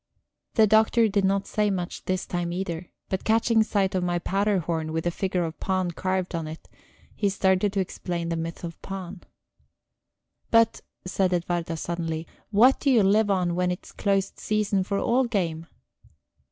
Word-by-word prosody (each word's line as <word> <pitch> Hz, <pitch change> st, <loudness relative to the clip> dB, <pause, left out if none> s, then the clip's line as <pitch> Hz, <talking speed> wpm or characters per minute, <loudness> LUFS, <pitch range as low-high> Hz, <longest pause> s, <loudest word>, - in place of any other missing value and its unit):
The 220 Hz, -, +6 dB
Doctor 220 Hz, +2 st, +4 dB
did 200 Hz, -1 st, +1 dB
not 195 Hz, +1 st, +1 dB
say 210 Hz, -1 st, 0 dB
much 180 Hz, -2 st, -4 dB
this 185 Hz, 0 st, -1 dB
time 175 Hz, -1 st, -2 dB
either, 175 Hz, -1 st, -4 dB, 0.2 s
but 190 Hz, -, -3 dB
catching 225 Hz, 0 st, +3 dB
sight 200 Hz, -3 st, +1 dB
of 185 Hz, -1 st, 0 dB
my 175 Hz, 0 st, 0 dB
powder 200 Hz, +3 st, +1 dB
horn, 160 Hz, -2 st, -2 dB
with 160 Hz, +1 st, -2 dB
a 175 Hz, -, +1 dB
figure 185 Hz, 0 st, -1 dB
of 165 Hz, -1 st, -5 dB
Pan 185 Hz, -2 st, 0 dB
carved 185 Hz, +1 st, -2 dB
on 165 Hz, -2 st, -3 dB
it, 155 Hz, +1 st, -9 dB, 0.5 s
he 200 Hz, -, +1 dB
started 190 Hz, 0 st, +2 dB
to 200 Hz, -, 0 dB
explain 175 Hz, -2 st, -3 dB
the 165 Hz, -, -1 dB
myth 165 Hz, +1 st, -5 dB
of 170 Hz, -1 st, -7 dB
Pan. 190 Hz, -1 st, -7 dB, 1.3 s
"But," 230 Hz, -1 st, +4 dB, 0.2 s
said 185 Hz, 0 st, +1 dB
Edwarda 170 Hz, -1 st, -1 dB
suddenly, 165 Hz, -1 st, -3 dB, 0.2 s
"what 235 Hz, +6 st, +5 dB
do 285 Hz, -, +1 dB
you 235 Hz, -6 st, +5 dB
live 205 Hz, +2 st, +3 dB
on 180 Hz, -3 st, +1 dB
when 180 Hz, +1 st, +1 dB
it's 180 Hz, -, -5 dB
closed 195 Hz, -1 st, -1 dB
season 210 Hz, -2 st, 0 dB
for 200 Hz, +1 st, -2 dB
all 250 Hz, +5 st, +2 dB
game?" 170 Hz, -8 st, -2 dB
185 Hz, 175 wpm, -26 LUFS, 175-205 Hz, 1.3 s, The